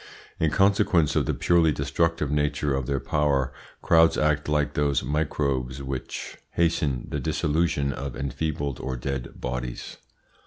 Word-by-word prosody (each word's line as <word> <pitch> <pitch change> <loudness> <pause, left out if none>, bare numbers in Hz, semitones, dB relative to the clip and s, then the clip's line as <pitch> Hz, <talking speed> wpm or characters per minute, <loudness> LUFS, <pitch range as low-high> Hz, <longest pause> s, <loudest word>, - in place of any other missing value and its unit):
In 80 - +3
consequence 95 -4 +3
of - - +1
the - - +1
purely 85 -2 +3
destructive 75 +2 0
nature 75 -1 0
of 65 -2 -2
their 70 -1 0
power 70 -3 0 0.3
crowds 80 0 +5
act 75 -1 +1
like 75 -1 +1
those 70 -1 +1
microbes 70 -3 -1
which 65 -1 -5
hasten 75 -6 +1
the - - -2
dissolution 75 -2 0
of 70 -1 -5
enfeebled 70 +1 -3
or 65 -1 -3
dead 65 0 -5
bodies. 60 -1 -5
75 Hz, 140 wpm, -26 LUFS, 70-80 Hz, 0.3 s, crowds